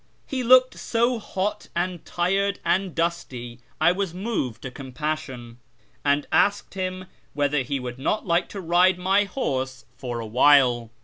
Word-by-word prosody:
He 265 Hz, -2 st, -3 dB
looked 255 Hz, +1 st, +5 dB
so 235 Hz, +1 st, +1 dB
hot 200 Hz, -1 st, -3 dB
and 175 Hz, -1 st, -2 dB
tired 195 Hz, +3 st, 0 dB
and 190 Hz, -1 st, 0 dB
dusty 130 Hz, -8 st, -3 dB
that 120 Hz, -, -32 dB, 0.2 s
I 160 Hz, +3 st, +5 dB
was 185 Hz, -2 st, -2 dB
moved 180 Hz, -, -3 dB
to 130 Hz, -, -5 dB
compassion, 130 Hz, -3 st, -5 dB, 0.4 s
and 145 Hz, 0 st, +2 dB
asked 205 Hz, 0 st, +2 dB
him 185 Hz, -1 st, -4 dB, 0.3 s
whether 145 Hz, -1 st, +1 dB
he 135 Hz, +2 st, -2 dB
would 125 Hz, 0 st, -6 dB
not 210 Hz, +10 st, -1 dB
like 170 Hz, -1 st, +1 dB
to 200 Hz, -, -6 dB
ride 175 Hz, +2 st, +3 dB
my 195 Hz, +3 st, +2 dB
horse 130 Hz, -, -3 dB
for 120 Hz, -2 st, -4 dB
a 115 Hz, -, -5 dB
while. 125 Hz, 0 st, +4 dB
170 Hz, 160 wpm, -24 LUFS, 130-195 Hz, 0.4 s, looked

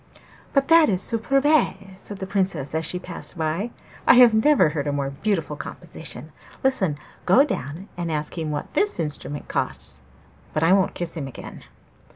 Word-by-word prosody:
'But 275 Hz, -1 st, +2 dB
that 330 Hz, -3 st, +7 dB
is 185 Hz, -3 st, +1 dB
superbe!' 255 Hz, -2 st, +2 dB
said 200 Hz, +1 st, -8 dB
the 190 Hz, -, -5 dB
Princess 185 Hz, -8 st, -1 dB
as 160 Hz, 0 st, -1 dB
she 180 Hz, -, -3 dB
passed 180 Hz, 0 st, -7 dB
by. 165 Hz, +8 st, -1 dB, 0.4 s
'I -, -, +8 dB
have 245 Hz, -2 st, +8 dB
never 220 Hz, -, +4 dB
heard 150 Hz, -1 st, -3 dB
a -, -, +1 dB
more 140 Hz, -1 st, -2 dB
beautiful 160 Hz, 0 st, -2 dB
composition. -, -, -7 dB, 0.3 s
Listen! 195 Hz, -, +1 dB, 0.3 s
Go 255 Hz, +10 st, +6 dB
down 180 Hz, -, -5 dB
and 170 Hz, -2 st, -3 dB
ask 150 Hz, -1 st, -3 dB
him 160 Hz, -3 st, -3 dB
what 150 Hz, -1 st, -4 dB
this 415 Hz, 0 st, +1 dB
instrument 150 Hz, -2 st, -1 dB
costs; 70 Hz, -, -3 dB, 0.5 s
but 155 Hz, -, 0 dB
I 170 Hz, +3 st, +5 dB
won't 195 Hz, -1 st, +2 dB
kiss 175 Hz, -1 st, -4 dB
him 145 Hz, -4 st, -4 dB
again. 135 Hz, -, -10 dB
180 Hz, 175 wpm, -23 LUFS, 155-220 Hz, 0.5 s, I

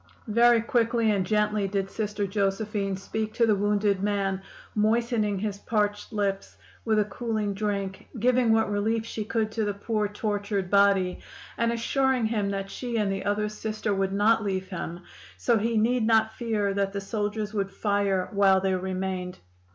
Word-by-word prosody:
"Very 235 Hz, 0 st, +5 dB
quickly 230 Hz, -2 st, +2 dB
and 200 Hz, -2 st, +1 dB
gently 210 Hz, +1 st, +1 dB
did 195 Hz, 0 st, -1 dB
Sister 210 Hz, -1 st, -2 dB
Josephine 195 Hz, 0 st, -1 dB
speak 215 Hz, +2 st, -4 dB
to 235 Hz, -, +4 dB
the 220 Hz, -, +4 dB
wounded 205 Hz, -1 st, +1 dB
man, 195 Hz, -2 st, 0 dB, 0.3 s
moistening 215 Hz, -1 st, +1 dB
his 200 Hz, 0 st, -3 dB
parched 205 Hz, -1 st, -1 dB
lips 200 Hz, -2 st, -2 dB, 0.3 s
with 220 Hz, -2 st, +1 dB
a 210 Hz, -, +3 dB
cooling 215 Hz, -1 st, -2 dB
drink, 200 Hz, -2 st, -3 dB
giving 245 Hz, 0 st, +3 dB
what 220 Hz, -1 st, +2 dB
relief 220 Hz, +2 st, 0 dB
she 220 Hz, -1 st, -4 dB
could 215 Hz, 0 st, -1 dB
to 220 Hz, 0 st, -1 dB
the 205 Hz, -1 st, -1 dB
poor, 210 Hz, +1 st, -1 dB
tortured 205 Hz, -2 st, -2 dB
body, 200 Hz, -2 st, +3 dB, 0.4 s
and 230 Hz, 0 st, +1 dB
assuring 255 Hz, +1 st, +1 dB
him 215 Hz, -3 st, 0 dB
that 195 Hz, 0 st, -3 dB
she 240 Hz, -2 st, -3 dB
and 205 Hz, -3 st, +1 dB
the 195 Hz, 0 st, -3 dB
other 210 Hz, +1 st, 0 dB
Sister 215 Hz, 0 st, -3 dB
would 195 Hz, 0 st, 0 dB
not 215 Hz, +3 st, +3 dB
leave 190 Hz, -2 st, -2 dB
him; 175 Hz, -2 st, -5 dB, 0.4 s
so 235 Hz, -3 st, +2 dB
he 230 Hz, +2 st, 0 dB
need 230 Hz, +1 st, +2 dB
not 220 Hz, -1 st, +3 dB
fear 215 Hz, -4 st, -1 dB
that 195 Hz, 0 st, -1 dB
the 200 Hz, -, -2 dB
soldiers 210 Hz, +1 st, -3 dB
would 200 Hz, -2 st, -1 dB
fire 200 Hz, -3 st, 0 dB
while 195 Hz, -1 st, +4 dB
they 190 Hz, 0 st, 0 dB
remained. 185 Hz, -1 st, -3 dB
210 Hz, 170 wpm, -27 LUFS, 195-220 Hz, 0.4 s, Very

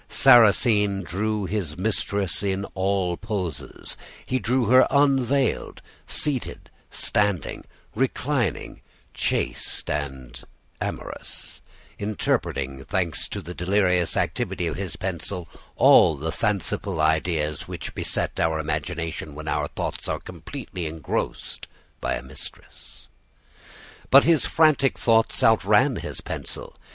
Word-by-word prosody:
Sarrasine 105 Hz, -3 st, +5 dB
drew 100 Hz, +5 st, -1 dB
his 95 Hz, -6 st, -3 dB
mistress 100 Hz, -2 st, -1 dB
in 100 Hz, 0 st, -1 dB
all 95 Hz, -2 st, 0 dB
poses: 100 Hz, -7 st, -4 dB, 0.3 s
he 130 Hz, -, 0 dB
drew 125 Hz, +3 st, +1 dB
her 130 Hz, +4 st, +6 dB
unveiled, 135 Hz, -2 st, +2 dB, 0.3 s
seated, 140 Hz, -5 st, -3 dB, 0.2 s
standing, 100 Hz, -6 st, 0 dB, 0.3 s
reclining, 130 Hz, -, -1 dB, 0.3 s
chaste, -, -, -1 dB
and 65 Hz, -4 st, -5 dB, 0.4 s
amorous -, -, -6 dB, 0.4 s
interpreting, 70 Hz, -10 st, -1 dB
thanks 85 Hz, -1 st, -1 dB
to 100 Hz, -, -5 dB
the 85 Hz, +2 st, -7 dB
delirious 90 Hz, -1 st, +1 dB
activity 90 Hz, -, -1 dB
of 80 Hz, -3 st, -2 dB
his 95 Hz, -1 st, -4 dB
pencil, 90 Hz, -1 st, -4 dB, 0.3 s
all 80 Hz, -, +6 dB
the 80 Hz, +3 st, -3 dB
fanciful 95 Hz, 0 st, -1 dB
ideas 80 Hz, -1 st, +1 dB
which -, -, -6 dB
beset -, -, -2 dB
our 80 Hz, -1 st, +2 dB
imagination 80 Hz, 0 st, -3 dB
when 80 Hz, +1 st, -8 dB
our 75 Hz, 0 st, 0 dB
thoughts -, -, -4 dB
are -, -, -2 dB
completely 90 Hz, -3 st, -7 dB
engrossed 80 Hz, -1 st, -4 dB, 0.3 s
by -, -, -1 dB
a -, -, -6 dB
mistress. 65 Hz, 0 st, -11 dB, 1.0 s
But 140 Hz, +1 st, +8 dB
his 165 Hz, -3 st, +3 dB
frantic 155 Hz, -4 st, +3 dB
thoughts 115 Hz, -1 st, +3 dB
outran 110 Hz, +4 st, +4 dB
his -, -, -6 dB
pencil. -, -, -5 dB
95 Hz, 110 wpm, -24 LUFS, 80-110 Hz, 1.0 s, But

